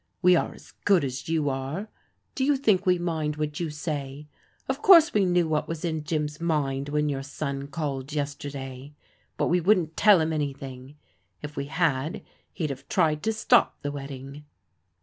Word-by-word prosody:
We 180 Hz, 0 st, +7 dB
are -, -, 0 dB
as -, -, -16 dB
good 195 Hz, -5 st, +4 dB
as 135 Hz, +2 st, -4 dB
you 160 Hz, -3 st, +1 dB
are. 135 Hz, +9 st, -3 dB, 0.5 s
Do 265 Hz, -, -1 dB
you 285 Hz, +1 st, +3 dB
think 205 Hz, -7 st, +2 dB
we 180 Hz, -1 st, +5 dB
mind 160 Hz, -3 st, -2 dB
what 150 Hz, 0 st, -3 dB
you 170 Hz, -2 st, -2 dB
say? 150 Hz, -2 st, -5 dB, 0.4 s
Of 265 Hz, +2 st, -2 dB
course 335 Hz, -4 st, +7 dB
we 205 Hz, -2 st, +3 dB
knew 175 Hz, -2 st, +2 dB
what 155 Hz, -1 st, 0 dB
was 165 Hz, 0 st, -4 dB
in 160 Hz, -2 st, -2 dB
Jim's 150 Hz, 0 st, -2 dB
mind 145 Hz, -4 st, -1 dB
when 150 Hz, 0 st, +1 dB
your 140 Hz, -2 st, -2 dB
son 140 Hz, 0 st, -4 dB
called 140 Hz, -2 st, -4 dB
yesterday: 140 Hz, -2 st, -5 dB, 0.4 s
but -, -, +1 dB
we 175 Hz, +1 st, +2 dB
wouldn't 175 Hz, -4 st, +2 dB
tell 205 Hz, -3 st, +6 dB
him 160 Hz, 0 st, 0 dB
anything. 135 Hz, -2 st, -5 dB, 0.5 s
If 150 Hz, 0 st, -7 dB
we 140 Hz, -, -3 dB
had, 145 Hz, 0 st, -1 dB, 0.3 s
he'd 155 Hz, -4 st, -3 dB
have 140 Hz, +1 st, -9 dB
tried 155 Hz, -2 st, +2 dB
to 220 Hz, -, 0 dB
stop 215 Hz, -1 st, +3 dB
the 145 Hz, -, -2 dB
wedding." 140 Hz, +1 st, -8 dB
150 Hz, 180 wpm, -26 LUFS, 140-170 Hz, 0.5 s, We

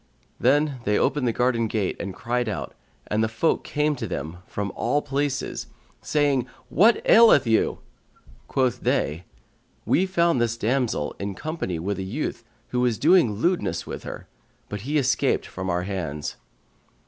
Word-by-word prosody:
Then 140 Hz, +1 st, +2 dB
they 105 Hz, 0 st, +2 dB
opened 140 Hz, -4 st, +1 dB
the -, -, +3 dB
garden 120 Hz, -1 st, +1 dB
gate 105 Hz, -3 st, -1 dB
and 100 Hz, -, -4 dB
cried 120 Hz, -1 st, -1 dB
out, 105 Hz, -, -4 dB, 0.3 s
and 110 Hz, +1 st, 0 dB
the -, -, +2 dB
folk 115 Hz, +9 st, 0 dB
came 150 Hz, 0 st, 0 dB
to 115 Hz, -, -4 dB
them 85 Hz, -1 st, -5 dB
from 100 Hz, -1 st, -3 dB
all 145 Hz, +5 st, 0 dB
places, 140 Hz, 0 st, -2 dB, 0.3 s
saying 140 Hz, -4 st, +1 dB, 0.2 s
"What 210 Hz, -, +4 dB
aileth 220 Hz, -, +7 dB
you?" 110 Hz, -1 st, +2 dB, 0.7 s
Quoth 130 Hz, -3 st, +1 dB
they, 80 Hz, +5 st, 0 dB, 0.6 s
"We 190 Hz, -, +2 dB
found 170 Hz, -7 st, +2 dB
this 120 Hz, 0 st, 0 dB
damsel 115 Hz, -, 0 dB
in 100 Hz, -1 st, -4 dB
company 155 Hz, -, -3 dB
with 95 Hz, +4 st, -3 dB
a -, -, -2 dB
youth 115 Hz, +4 st, -4 dB, 0.3 s
who 125 Hz, -, -1 dB
was 125 Hz, -3 st, +2 dB
doing 160 Hz, -, +4 dB
lewdness 105 Hz, -, 0 dB
with -, -, -6 dB
her; -, -, -8 dB, 0.4 s
but 105 Hz, -1 st, -5 dB
he 145 Hz, +7 st, -1 dB
escaped 135 Hz, -2 st, +1 dB
from 95 Hz, 0 st, -5 dB
our 90 Hz, 0 st, 0 dB
hands." 80 Hz, -7 st, -4 dB
120 Hz, 160 wpm, -24 LUFS, 100-145 Hz, 0.7 s, aileth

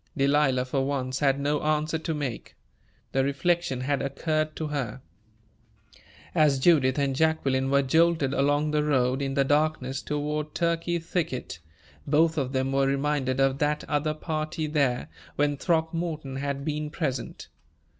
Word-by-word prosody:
Delilah, 135 Hz, -2 st, +3 dB
for 135 Hz, +1 st, -1 dB
once, 135 Hz, -1 st, -2 dB
had 140 Hz, -1 st, +2 dB
no 145 Hz, +1 st, 0 dB
answer 155 Hz, +1 st, 0 dB
to 160 Hz, 0 st, -3 dB
make. 140 Hz, -6 st, -5 dB, 0.6 s
The 135 Hz, -, +2 dB
reflection 140 Hz, 0 st, 0 dB
had 140 Hz, +1 st, 0 dB
occurred 155 Hz, +3 st, -1 dB
to 155 Hz, -1 st, -4 dB
her. 130 Hz, -4 st, -4 dB, 1.3 s
As 150 Hz, -3 st, +4 dB
Judith 130 Hz, -2 st, +4 dB
and 140 Hz, -2 st, 0 dB
Jacqueline 135 Hz, -4 st, +1 dB
were 140 Hz, 0 st, +3 dB
jolted 160 Hz, 0 st, +2 dB
along 145 Hz, +2 st, +1 dB
the 150 Hz, 0 st, +1 dB
road, 130 Hz, -2 st, +1 dB
in 135 Hz, -1 st, -2 dB
the 140 Hz, -, +4 dB
darkness, 145 Hz, -2 st, 0 dB
toward 150 Hz, +1 st, -3 dB
Turkey 170 Hz, 0 st, 0 dB
Thicket, 160 Hz, -, -3 dB, 0.5 s
both 160 Hz, +3 st, +3 dB
of 135 Hz, -4 st, -1 dB
them 130 Hz, 0 st, 0 dB
were 135 Hz, 0 st, +2 dB
reminded 135 Hz, -1 st, 0 dB
of 135 Hz, 0 st, +2 dB
that 150 Hz, 0 st, 0 dB
other 150 Hz, +1 st, -1 dB
party 155 Hz, 0 st, -3 dB
there, 140 Hz, -5 st, 0 dB, 0.3 s
when 145 Hz, 0 st, +1 dB
Throckmorton 160 Hz, -3 st, -1 dB
had 140 Hz, 0 st, -3 dB
been 150 Hz, 0 st, -2 dB
present. 140 Hz, -6 st, -4 dB
145 Hz, 145 wpm, -26 LUFS, 135-155 Hz, 1.3 s, As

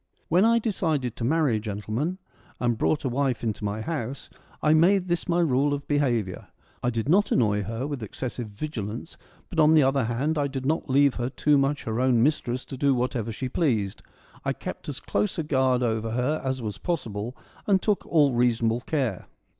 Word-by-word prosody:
When 180 Hz, +5 st, +4 dB
I 230 Hz, +1 st, +5 dB
decided 160 Hz, -, -1 dB
to -, -, -5 dB
marry, 140 Hz, -4 st, +2 dB
gentlemen, 110 Hz, -, -3 dB, 0.4 s
and 120 Hz, -1 st, +1 dB
brought 150 Hz, +7 st, 0 dB
a -, -, 0 dB
wife 130 Hz, -1 st, 0 dB
into 110 Hz, -2 st, -2 dB
my 105 Hz, +1 st, -2 dB
house, 140 Hz, -2 st, -4 dB, 0.3 s
I 150 Hz, -, +5 dB
made 180 Hz, +4 st, +4 dB
this 175 Hz, 0 st, -1 dB
my 175 Hz, 0 st, +3 dB
rule 145 Hz, -2 st, +2 dB
of 140 Hz, -, -8 dB
behaviour. 120 Hz, -10 st, 0 dB, 0.3 s
I 120 Hz, -, +1 dB
did 115 Hz, 0 st, -2 dB
not 195 Hz, +7 st, +3 dB
annoy 105 Hz, -4 st, +2 dB
her 115 Hz, +5 st, -3 dB
with 145 Hz, -3 st, -4 dB
excessive 120 Hz, +2 st, -5 dB
vigilance, 115 Hz, +2 st, -5 dB, 0.4 s
but 170 Hz, -, -2 dB
on 155 Hz, +1 st, +6 dB
the 155 Hz, -, +6 dB
other 135 Hz, -1 st, +2 dB
hand, 140 Hz, +7 st, 0 dB
I 145 Hz, -, +1 dB
did 135 Hz, -1 st, -5 dB
not 155 Hz, +1 st, 0 dB
leave 140 Hz, 0 st, +4 dB
her 120 Hz, 0 st, -1 dB
too 150 Hz, +2 st, +2 dB
much 140 Hz, +1 st, +1 dB
her 110 Hz, +1 st, -2 dB
own 125 Hz, -3 st, +3 dB
mistress 130 Hz, -4 st, 0 dB
to 135 Hz, -, -7 dB
do 140 Hz, 0 st, +3 dB
whatever 120 Hz, -2 st, -1 dB
she 130 Hz, +4 st, -4 dB
pleased. 115 Hz, -, 0 dB, 0.4 s
I -, -, 0 dB
kept -, -, -7 dB
as -, -, -5 dB
close 105 Hz, +1 st, -1 dB
a 165 Hz, -, 0 dB
guard 130 Hz, -4 st, +2 dB
over 115 Hz, -1 st, 0 dB
her 125 Hz, +6 st, 0 dB
as 130 Hz, -2 st, -2 dB
was 105 Hz, -2 st, -4 dB
possible 125 Hz, -, -3 dB, 0.3 s
and 195 Hz, -2 st, +4 dB
took 205 Hz, +1 st, 0 dB
all 145 Hz, -5 st, +4 dB
reasonable 120 Hz, -1 st, +2 dB
care. 130 Hz, -, -2 dB
130 Hz, 195 wpm, -26 LUFS, 115-150 Hz, 0.4 s, on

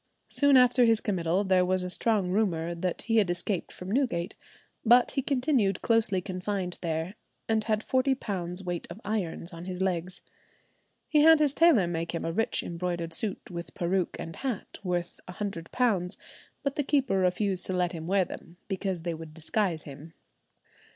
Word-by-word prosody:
Soon 285 Hz, -2 st, +4 dB
after 250 Hz, 0 st, +5 dB
his 225 Hz, -2 st, +4 dB
committal 185 Hz, -2 st, 0 dB
there 185 Hz, -2 st, +3 dB
was 185 Hz, 0 st, +1 dB
a 180 Hz, -, -3 dB
strong 205 Hz, -3 st, +2 dB
rumour 175 Hz, -5 st, 0 dB
that 170 Hz, +1 st, -3 dB
he 225 Hz, -1 st, +1 dB
had 205 Hz, -5 st, +4 dB
escaped 175 Hz, +1 st, -2 dB
from 180 Hz, +1 st, -8 dB
Newgate, 215 Hz, -8 st, 0 dB, 0.5 s
but 240 Hz, +2 st, +5 dB
he 270 Hz, -, 0 dB
continued 255 Hz, -8 st, +1 dB
closely 220 Hz, -5 st, +2 dB
confined 185 Hz, 0 st, -3 dB
there, 165 Hz, +2 st, -2 dB, 0.3 s
and 220 Hz, -1 st, +1 dB
had 215 Hz, -1 st, 0 dB
forty 265 Hz, +1 st, +2 dB
pounds 185 Hz, -6 st, -5 dB
weight 175 Hz, -2 st, -4 dB
of 170 Hz, +5 st, -8 dB
irons 190 Hz, -4 st, -3 dB
on 170 Hz, +1 st, -8 dB
his 180 Hz, -1 st, -5 dB
legs. 185 Hz, -1 st, -2 dB, 0.9 s
He 300 Hz, -2 st, +4 dB
had 320 Hz, +1 st, +8 dB
his 295 Hz, -3 st, +3 dB
tailor 320 Hz, -, +5 dB
make 170 Hz, 0 st, -3 dB
him -, -, -3 dB
a 165 Hz, -, -1 dB
rich 225 Hz, +5 st, 0 dB
embroidered 170 Hz, -1 st, -3 dB
suit 200 Hz, +1 st, -3 dB
with 170 Hz, -1 st, -7 dB
peruke 180 Hz, +1 st, 0 dB
and 165 Hz, -1 st, -7 dB
hat, 260 Hz, -7 st, -4 dB
worth 175 Hz, -2 st, -2 dB
£100; 190 Hz, +1 st, -1 dB, 0.5 s
but 280 Hz, 0 st, -1 dB
the 290 Hz, -, 0 dB
keeper 270 Hz, -8 st, +1 dB
refused 185 Hz, 0 st, 0 dB
to 185 Hz, -, -2 dB
let 180 Hz, -1 st, +1 dB
him 165 Hz, -2 st, -6 dB
wear 190 Hz, 0 st, +3 dB
them, 170 Hz, 0 st, -10 dB
because 190 Hz, -3 st, -3 dB
they 170 Hz, -1 st, -2 dB
would 160 Hz, -1 st, -9 dB
disguise 165 Hz, 0 st, -1 dB
him. 150 Hz, +3 st, -11 dB
185 Hz, 175 wpm, -28 LUFS, 175-225 Hz, 0.9 s, had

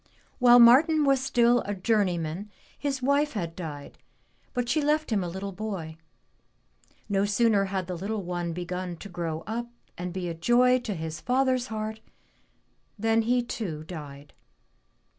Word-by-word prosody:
While 245 Hz, -1 st, +7 dB
Martin 285 Hz, +6 st, +6 dB
was 275 Hz, -2 st, +3 dB
still 245 Hz, -2 st, +3 dB
a 205 Hz, -, -3 dB
journeyman 185 Hz, -3 st, 0 dB, 0.3 s
his 275 Hz, -2 st, -3 dB
wife 285 Hz, +2 st, +2 dB
had 170 Hz, -6 st, -4 dB
died, 150 Hz, -5 st, -8 dB, 0.5 s
but 245 Hz, -1 st, -2 dB
she 310 Hz, +6 st, +1 dB
left 300 Hz, -1 st, +1 dB
him 205 Hz, -4 st, +1 dB
a -, -, -3 dB
little 190 Hz, +3 st, -5 dB
boy. 185 Hz, -6 st, -5 dB, 1.1 s
No 195 Hz, -1 st, +1 dB
sooner 205 Hz, 0 st, +3 dB
had 190 Hz, -1 st, -3 dB
the 180 Hz, 0 st, -5 dB
little 200 Hz, +4 st, -3 dB
one 175 Hz, -1 st, -3 dB
begun 180 Hz, +1 st, -4 dB
to 200 Hz, -, -10 dB
grow 165 Hz, -3 st, -4 dB
up 235 Hz, +2 st, -3 dB, 0.3 s
and 180 Hz, 0 st, -4 dB
be 180 Hz, 0 st, -4 dB
a 170 Hz, -, -3 dB
joy 245 Hz, +9 st, +3 dB
to 225 Hz, -5 st, -4 dB
his 160 Hz, -1 st, -5 dB
father's 255 Hz, 0 st, +1 dB
heart 220 Hz, 0 st, -4 dB, 1.0 s
than 225 Hz, +2 st, +2 dB
he 245 Hz, +2 st, +1 dB
too 180 Hz, -10 st, -5 dB
died. 145 Hz, -4 st, -9 dB
205 Hz, 155 wpm, -27 LUFS, 175-245 Hz, 1.1 s, While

